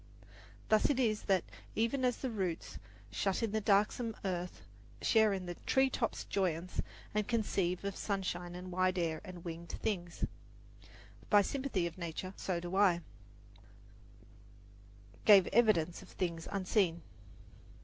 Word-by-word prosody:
Thus 215 0 +4
it 275 -3 +1
is 215 -4 +1
that 190 -3 +3 0.3
Even 230 +4 +1
as 250 -1 +2
the 260 - -3
roots, 185 -6 -3 0.3
shut 195 +2 0
in 225 - 0
the 220 0 0
darksome 210 +3 +2
earth, 180 -1 -3 0.4
Share 220 -2 +5
in 190 -2 -2
the 175 - -4
tree 265 0 +4
top's 230 - -1
joyance, 180 -2 -1 0.3
and 210 -1 0
conceive 195 -6 0
Of 200 -1 -2
sunshine 180 -3 -3
and 180 +1 -7
wide 185 +1 +1
air 165 -2 -1
and 180 -3 -9
wingéd 170 0 -6
things, 175 -5 -2 1.0
By 205 -1 +6
sympathy 260 -8 -1
of 170 +1 -5
nature, 170 +2 -4
so 180 -3 -2
do 175 +2 -5
I 190 -4 +5 2.3
have 200 -3 +9
evidence 190 -8 +3
of - - -14
things 170 -3 -3
unseen. 185 -4 +1
190 Hz, 140 wpm, -34 LUFS, 175-215 Hz, 2.3 s, have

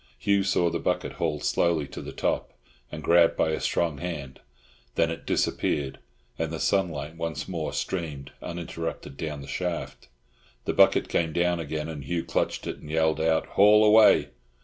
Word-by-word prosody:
Hugh 100 -1 +2
saw 85 -3 +2
the 85 - -2
body - - -1
hauled 75 -3 -2
slowly 80 -4 +1
to - - -7
the - - -7
top - - -2 0.4
and 75 0 -7
grabbed 85 +1 +4
by 80 - +2
a 80 - -1
strong 80 -5 0
hand; 75 -7 -6 0.6
then 80 0 +2
it 80 - -7
disappeared, 70 -2 0 0.4
and 80 -1 -1
the 80 - -4
sunlight 80 -5 -1
once 85 -1 -4
more 80 -4 -3
streamed, 75 -7 -4
uninterrupted, 85 -4 -5
down 75 -1 -5
the 70 - -10
shaft. 90 +4 -4 0.6
The - - 0
bucket - - +5
came 80 -2 0
down 85 0 +1
again, 80 -1 -3
and 75 -3 -6
Hugh 85 +4 -2
clutched - - -1
it - - -4
and 75 - -12
yelled 80 0 +1
out, 80 0 +2
"Haul 105 +2 +6
away!" 105 0 +6
80 Hz, 170 wpm, -26 LUFS, 75-85 Hz, 0.6 s, Haul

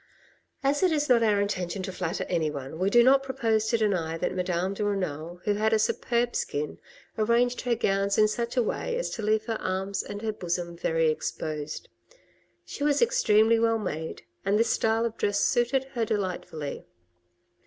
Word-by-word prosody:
As 280 +2 +2
it 370 -2 +4
is 295 -2 0
not 240 -2 +5
our 210 -3 +3
intention 190 -2 -2
to 190 - -4
flatter 180 0 -3
anyone, 155 -3 -2
we 190 +2 +2
do 240 +3 +6
not 270 +2 +6
propose 225 -5 0
to 230 - +2
deny 180 -7 0
that 165 - -2
Madame 180 +1 -1
de 210 - -3
Renal, 175 -4 -3
who 210 - +1
had 215 +2 +1
a - - +5
superb 235 +2 0
skin, 150 0 -3 0.4
arranged 235 +3 +2
her 245 -2 +1
gowns 195 -2 +1
in 215 - +6
such 235 +3 -3
a 245 - +4
way 475 - -2
as - - -2
to 225 - -5
leave 215 +1 +1
her 225 -1 -3
arms 190 +1 -2
and 205 +2 -7
her 220 -1 -1
bosom 175 -2 -3
very 165 -1 +1
exposed. 155 -1 -4 0.8
She 285 - -6
was 290 -1 +3
extremely 230 - +4
well 225 0 +3
made, 160 -6 -5 0.2
and 200 +2 +2
this 230 +1 +2
style 225 +1 +1
of 230 -1 -4
dress 205 0 +1
suited 240 +5 +2
her 235 -3 0
delightfully. 180 -8 -3
210 Hz, 185 wpm, -27 LUFS, 180-235 Hz, 0.8 s, do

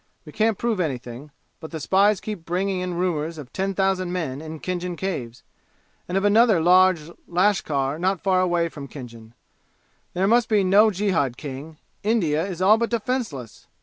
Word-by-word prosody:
We 150 - -10
can't 220 +3 +1
prove 230 -4 -1
anything, 130 -3 -4 0.3
but 160 - -8
the 160 - -6
spies 195 +6 +3
keep 210 -6 -6
bringing 185 +3 -1
in 180 -1 -3
rumors 165 -2 -1
of 140 -5 -10
ten 195 0 -2
thousand 190 -2 0
men 155 -6 -3
in 160 0 -8
Khinjan 180 0 -3
Caves, 125 -12 -4 0.6
and 180 - -1
of 195 - 0
another 215 -2 +5
large 180 -1 +4 0.2
lashkar 160 -7 +1
not 190 +1 0
far 185 -2 +2
away 175 -2 +1
from 145 -4 -9
Khinjan. 115 -4 -11 0.8
There 185 +2 +1
must 235 +2 +3
be 210 -3 +3
no 200 +4 +5
jihad, 180 - 0
King! 145 +2 -8 0.2
India 170 -8 +1
is 185 -1 -4
all 215 +3 +6
but 235 - 0
defenseless! 220 - -4
180 Hz, 170 wpm, -23 LUFS, 150-195 Hz, 0.8 s, all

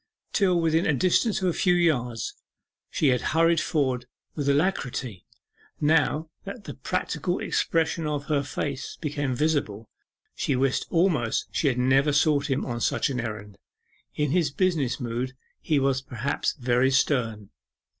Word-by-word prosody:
Till 185 -4 +3
within 165 0 +2
a 150 - +2
distance 190 - +2
of - - +2
a 175 - +1
few 180 +1 +2
yards 125 -10 0 0.6
she 150 - +2
had 125 -2 +2 0.2
hurried 165 -1 +4
forward 130 -6 -1 0.3
with 145 -2 -1
alacrity 135 - -1 0.5
now 155 +1 +2 0.2
that 200 +2 -8
the - - -7
practical 180 +4 -2
expression 160 -1 0
of 145 -1 -2
his 140 -1 -1
face 140 -2 -4
became 145 -4 -2
visible 120 -8 -1 0.4
she 135 - -1
wished 130 +1 0
almost 165 -10 +1
she 150 - 0
had 130 -3 +1
never 135 +3 +3
sought 145 0 +2
him 135 +1 0
on 120 -1 -4
such - - +1
an 130 - -2
errand; 105 -3 -6 0.6
in 150 -2 0
his 170 -3 +2
business 150 -5 0
mood 125 +1 -3 0.3
he 155 - +1
was 135 -1 +1
perhaps 130 +1 -2
very 125 -1 +2
stern. 115 -6 0
140 Hz, 150 wpm, -26 LUFS, 125-160 Hz, 0.6 s, hurried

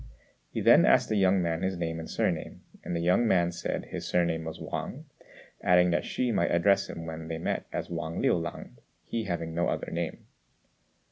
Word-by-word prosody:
He - - -3
then - - +7
asked - - +4
the 110 - +1
young 95 -2 +3
man 85 0 -1
his 95 -1 -1
name 80 -1 -3
and 80 - -7
surname; - - -2 0.2
and 85 - -3
the 85 - -1
young 90 +7 +3
man 85 -4 +3
said 85 - -3
his - - -6
surname 85 -2 +1
was 80 - -6
Wang, - - -5 0.6
adding 90 0 +4
that 85 - 0
Hsü 125 -2 -1
might 85 - +2
address 100 +3 +3
him 80 - -6
when 80 0 -6
they 80 0 -3
met 80 - -2
as - - -4
Wang 85 -1 -3
Liu - - +3
lang, 85 -1 -4 0.3
he 115 -1 -3
having 85 -3 -3
no 85 +1 +1
other - - -3
name. 85 -1 -4
85 Hz, 200 wpm, -28 LUFS, 80-90 Hz, 0.6 s, then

